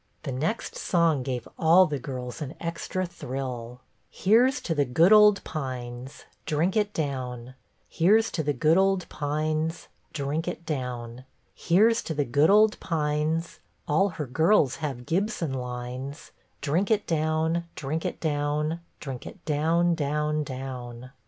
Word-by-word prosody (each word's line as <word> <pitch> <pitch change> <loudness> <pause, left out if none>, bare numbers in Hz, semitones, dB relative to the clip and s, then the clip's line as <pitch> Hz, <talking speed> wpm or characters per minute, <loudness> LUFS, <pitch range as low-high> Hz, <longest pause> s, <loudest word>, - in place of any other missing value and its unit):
The 140 - -4
next 155 - -2
song 165 -5 +2
gave 125 -2 -4
all 170 +3 +6
the 145 -4 -3
girls 125 +1 -6
an 145 0 -5
extra 170 +2 -3
thrill. 125 -7 -6
" - - -43
' - - -44
Here 230 +6 +4
's 275 - -4
to 165 - -1
the 145 -2 +2
good 160 +10 +4
old 210 -1 +6
Pines, 130 -3 -6 0.2
Drink 160 +5 +1
it 210 -1 +1
down; 130 - -4 0.3
Here 195 +7 +4
's 225 - -2
to 160 - -1
the 150 -1 0
good 155 +6 +3
old 195 -2 +2
Pines, 155 +2 -2 0.2
Drink 150 +3 -2
it 175 -1 -5
down; 125 -4 -4 0.3
Here 200 +7 +4
to 225 -8 -2
the 145 -1 +1
good 145 +5 +3
old 210 +1 +5
Pines, 155 +1 -1 0.3
All 195 +7 +3
her 150 - -2
girls 155 - +3
have 135 -6 -4
Gibson 175 - -1
lines, 125 +3 -6 0.3
Drink 165 +7 0
it 215 -2 +2
down, 160 +1 0
Drink 155 +3 -3
it - - -3
down, 150 +1 -1 0.2
Drink 135 -4 -7
it 195 - -12
down, 165 +3 +2
down, 150 0 0
down. 130 -2 -7
150 Hz, 155 wpm, -26 LUFS, 130-170 Hz, 0.3 s, all